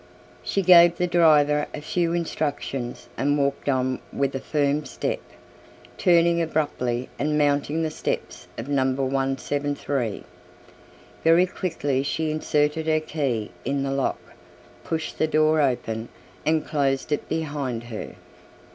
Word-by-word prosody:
She 195 - -1
gave 175 -1 +7
the 180 - +1
driver 150 -4 +4
a - - -5
few 170 +2 0
instructions 145 -6 -3
and 145 +2 +1
walked 140 0 0
on 130 -1 0
with 140 -1 -1
a 135 - -2
firm 145 +1 0
step, - - -3 0.8
turning 170 -1 +4
abruptly 135 -6 -1
and 150 +1 +1
mounting 145 +2 +1
the 160 - -1
steps - - -4
of - - -5
Number 135 -1 +1
173. 135 -2 -1 1.0
Very 165 +2 +6
quickly 160 -7 -2
she 155 +3 -1
inserted 155 0 0
her 155 0 +3
key 140 -9 -2
in 135 +1 -1
the 135 - -1
lock, 135 -1 0 0.7
pushed 160 -1 -4
the 155 - +3
door 155 0 +3
open 115 -4 -1 0.4
and 155 0 +2
closed 140 -2 0
it 150 - -1
behind 145 -7 -2
her. 120 -2 -7
145 Hz, 130 wpm, -24 LUFS, 135-160 Hz, 1.0 s, gave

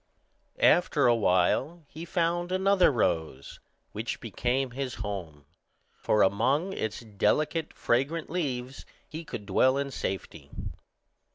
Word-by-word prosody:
After 175 - +4
a 120 - +6
while 115 - +1
he 160 +4 -9
found 175 +1 0
another 190 -2 +4
rose, 80 - -2 0.3
which - - -4
became 125 +1 -1
his 130 0 -4
home, 90 -9 -6 0.6
for 105 - +3
among 135 - +1
its 110 - -3
delicate 150 +9 0
fragrant 140 +7 0
leaves 135 -7 -3 0.2
he 160 +1 -7
could 120 -9 -7
dwell 130 +7 +3
in 140 0 -2
safety. 95 -7 -5
130 Hz, 115 wpm, -28 LUFS, 105-165 Hz, 0.6 s, a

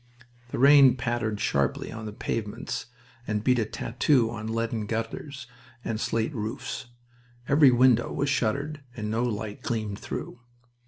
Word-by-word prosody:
The - - -4
rain 140 -1 +7
pattered 115 -3 -1
sharply 70 -7 0
on 110 -1 -6
the - - -5
pavements 105 +1 -4 0.4
and 105 -1 -1
beat 125 0 +3
a 110 - +1
tattoo 120 +2 +1
on 110 -1 -5
leaden 115 -1 -2
gutters 120 +5 -4 0.4
and 110 -1 -2
slate 115 +6 -1
roofs. 120 +2 -4 0.6
Every 140 -1 +6
window 120 -1 +4
was 140 - -1
shuttered 140 +3 -1 0.2
and 105 -1 -3
no 115 +2 0
light 110 -3 -3
gleamed 110 -3 -3
through. 120 - -6
115 Hz, 145 wpm, -27 LUFS, 110-130 Hz, 0.6 s, rain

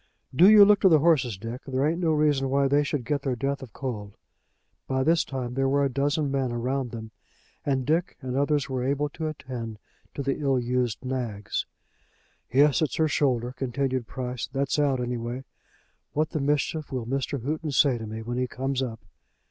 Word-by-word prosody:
"Do 180 +8 +8
you 210 -1 +9
look 205 0 +5
to 190 - +6
the 160 - +7
horses, 145 - +2
Dick. 115 +6 -6
There 130 +1 0
ain't 165 +3 0
no 165 - +2
reason 150 -3 +2
why 140 +1 +3
they 145 +2 +3
should 145 -4 -2
get 145 +2 0
their 135 -3 -1
death 140 +3 -2
of 130 -4 -9
cold." 105 -6 -5 0.7
By 130 0 0
this 165 +3 +3
time 125 -3 -4
there 135 +1 +1
were 140 +1 +2
a 135 - -1
dozen 145 +1 0
men 135 -3 0
round 125 +2 -1
them, 110 -1 -8 0.5
and 135 -3 0
Dick 165 +5 0
and 130 -2 -4
others 145 0 +1
were 130 -2 -2
able 140 +2 0
to 160 +2 -4
attend 125 -7 -6 0.4
to 140 - -3
the 135 +1 -1
ill 135 -3 +2
used 125 0 -1
nags. 115 -6 -3 0.8
"Yes; 140 +3 +4
it's 155 - 0
her 160 - +2
shoulder," 125 -5 +1
continued 130 -1 -2
Price. 125 -3 -4
"That's 140 +2 0
out, 140 -3 +2
any 125 0 -2
way. 120 +3 -5 0.7
What 155 +1 0
the 155 - -2
mischief 145 +2 0
will 125 -3 -3
Mr. 135 0 -2
Houghton 155 +2 -2
say 135 -3 +3
to 110 - -6
me 110 +1 -6
when 120 +2 -3
he 125 - 0
comes 135 +2 -2
up!" 115 -3 -4
135 Hz, 200 wpm, -26 LUFS, 125-145 Hz, 0.8 s, you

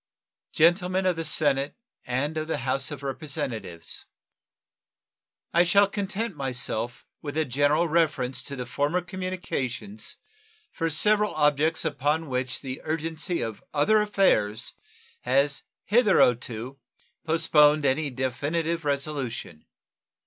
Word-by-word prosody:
Gentlemen 180 +3 +3
of 185 -1 +2
the 165 - -2
Senate 145 -3 +2 0.3
and 135 +5 -1
of 155 0 -2
the 160 - -1
House 130 +2 -1
of 145 -2 -7
Representatives: 115 - -5 1.5
I 170 - +6
shall 200 +3 +5
content 205 +1 -3
myself 125 -3 -3 0.2
with 145 0 -5
a 160 - +2
general 145 +6 +2
reference 150 -6 +1
to 135 -3 -5
former 145 +7 0
communications 185 - -4 0.6
for 165 - -1
several 210 +6 +3
objects 150 +1 +2
upon 150 +2 0
which 125 -1 -2
the 130 -1 -6
urgency 160 +2 -1
of 110 -2 -6
other 210 +9 +4
affairs 120 - +1 0.5
has 140 +3 +1 0.2
hitherto 130 - +2 0.4
postponed 155 -2 +4
any 140 +3 +1
definitive 145 +6 -2
resolution. 140 - -3
150 Hz, 110 wpm, -26 LUFS, 130-170 Hz, 1.5 s, I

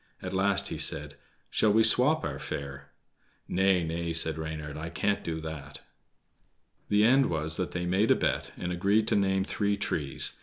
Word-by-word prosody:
At 95 0 -7
last 100 +1 +1
he - - -5
said: 75 0 +1 0.4
"Shall 110 - +2
we 110 +2 +4
swap 130 +8 +5
our 70 -3 -5
fare?" 70 0 -7 0.6
"Nay, 95 -1 +2
nay!" 85 +1 -3
said 80 -1 +3
Reynard, 80 -2 -6
"I 80 +2 -6
can't 100 +5 -1
do 80 -1 -4
that." 80 -3 -8 1.1
The 105 +1 +3
end 130 +4 +4
was 80 -1 0
that 90 - -2
they 90 0 -3
made 95 +5 +1
a - - +5
bet, - - -2
and 90 - -4
agreed 100 +5 +1
to - - +1
name 95 -1 +1
three 100 0 -1
trees. 75 -8 -1
90 Hz, 180 wpm, -28 LUFS, 80-100 Hz, 1.1 s, swap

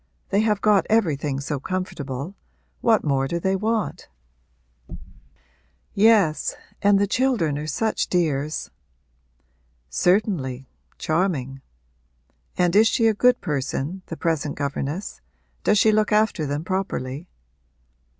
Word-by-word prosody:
They 200 - +2
have 210 -2 +1
got 210 -3 +3
everything 150 -10 +1
so 140 0 -3
comfortable 150 -2 -4 0.4
what 225 -2 +3
more 135 -2 +1
do 170 +4 -2
they 190 +2 0
want?' 215 +1 -2 1.9
'Yes, 200 -7 +3 0.3
and 205 0 +5
the 200 - +3
children 215 - +1
are 150 - -5
such 220 +9 -1
dears!' 155 -4 -1 1.2
'Certainly 145 - +1 0.3
charming. 155 -6 -1 1.0
And 180 0 +2
is 220 +2 +6
she 230 0 +2
a 225 - +5
good 250 +4 +3
person, 150 +3 -3
the 165 - -6
present 155 -3 -1
governess? 145 +5 -4 0.4
Does 210 - +3
she 215 +2 +5
look 215 0 +2
after 210 -7 +2
them 145 +2 -2
properly?' 175 -5 -3
180 Hz, 115 wpm, -23 LUFS, 145-210 Hz, 1.9 s, is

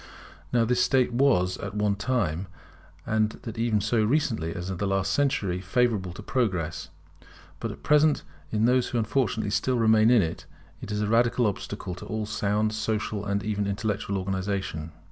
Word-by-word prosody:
Now 120 -2 +3
this 125 +2 +2
state 130 -3 +2
was 120 -9 +3
at 100 +1 -6
one 105 -1 +2
time, 100 -6 -1 0.6
and 110 0 +1
that 115 -1 -6
even 115 -2 +2
so 110 +2 +1
recently 110 - 0
as 90 +1 -5
the 100 +3 -2
last 95 0 0
century, 100 -11 0
favourable 100 -1 +1
to 105 - -9
progress; 90 - -1 0.7
but - - -3
at - - -12
present 150 0 +4 0.3
in 110 +5 +1
those 125 +1 +3
who 120 - -2
unfortunately 110 -2 0
still 130 +4 +1
remain 110 -1 +5
in 120 -5 +5
it, 80 - -5 0.3
it 105 - -7
is 105 0 -1
a - - 0
radical 120 +2 +3
obstacle 95 -1 -3
to 90 - -9
all 110 -1 -2
sound 105 0 0
social 110 -1 -2
and 100 0 -1
even 105 -1 -1
intellectual 100 0 -2
organization. 95 -4 -3
105 Hz, 170 wpm, -26 LUFS, 95-115 Hz, 0.7 s, remain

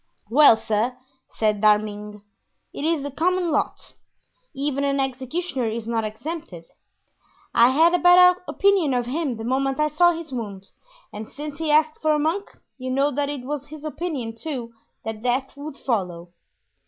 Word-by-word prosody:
"Well, 280 -3 +7
sir," 225 +4 -1 0.3
said 215 -2 0
D'Arminges, 210 -1 +1 0.5
"it - - -6
is 320 -2 +1
the 285 - -4
common 355 +3 0
lot; - - -2 0.6
even 280 0 -1
an 280 0 +1
executioner 265 +1 -2
is 220 0 -4
not 230 -1 0
exempted. 215 - -6 0.9
I 235 +1 +6
had 325 +6 +4
a 355 - +3
bad 360 +1 +7
opinion 385 -9 +2
of 245 -1 0
him 275 0 -2
the 225 - -6
moment 270 +3 0
I 305 0 +2
saw 345 +4 +4
his 330 -2 -8
wound, 205 -6 -6 0.4
and 215 +1 -7
since 295 0 -8
he 320 -1 -1
asked 310 +1 +3
for 310 -1 +3
a - - +2
monk 325 +7 -1 0.3
you 255 0 -5
know 275 +3 +2
that 285 +1 -1
it 290 -3 -4
was 290 0 -4
his 310 0 -10
opinion, 300 -8 -4
too, 240 -3 -5 0.3
that 220 -1 -5
death 250 +3 -1
would 285 0 -8
follow." 180 -8 -3
275 Hz, 165 wpm, -23 LUFS, 230-310 Hz, 0.9 s, Well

